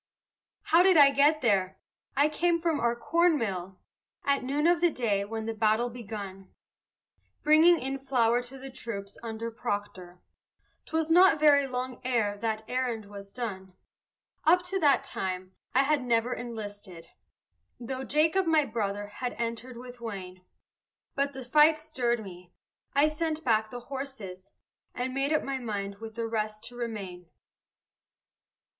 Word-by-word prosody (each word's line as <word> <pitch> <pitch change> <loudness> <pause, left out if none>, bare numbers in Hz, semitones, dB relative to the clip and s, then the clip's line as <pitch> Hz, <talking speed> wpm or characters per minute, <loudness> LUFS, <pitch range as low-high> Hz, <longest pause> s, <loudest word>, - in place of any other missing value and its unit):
How 335 +2 +5
did 370 -2 +5
I 280 -2 +8
get 290 +3 +4
there? 195 -5 +1 0.4
I 285 +2 +5
came 335 +2 +1
from 325 -3 0
our 235 0 +1
corn 335 +6 +2
mill 190 -6 -4 0.5
At 280 -1 +2
noon 285 +4 0
of 345 0 +4
the 350 - +5
day 220 -9 0
when 220 +1 -5
the 225 - -2
battle 220 +2 +1
begun, 200 -5 -8 0.9
Bringing 320 +3 +6
in 270 +1 -3
flour 245 -3 +2
to 250 +2 -9
the 270 0 -8
troops 200 -6 -6
under 230 0 -5
Proctor; 205 -5 -5 0.7
'Twas 320 0 -1
not 355 -2 +6
very 285 -2 +5
long 255 0 -4
ere 230 -5 +1
that 220 -1 -2
errand 245 -4 -2
was 200 -1 -10
done. 190 -6 -6 0.7
Up 355 +3 +4
to 385 +2 -2
that 290 -5 +4
time 185 0 -4 0.2
I 265 - +6
had 295 0 +2
never 240 0 +1
enlisted, 205 -7 -7 0.7
Though 260 +2 -5
Jacob, 320 +7 +2
my 315 -2 +4
brother, 205 -3 -2
had 245 +4 -5
entered 235 +1 -4
with 245 0 -11
Wayne; 185 -5 -7 0.7
But 280 0 -1
the 265 -2 -7
fight 300 +4 +5
stirred 250 -7 -1
me; 180 -2 -12 0.4
I 285 +2 +5
sent 315 0 -2
back 220 -2 +2
the 245 +1 -7
horses, 245 -9 -7 0.5
And 255 +1 -3
made 275 +2 0
up 310 - +2
my 270 -1 -3
mind 200 -4 -4
with 220 -1 -9
the 230 - -2
rest 215 -1 -3
to 245 - -15
remain. 195 -7 -6
240 Hz, 150 wpm, -28 LUFS, 210-285 Hz, 0.9 s, I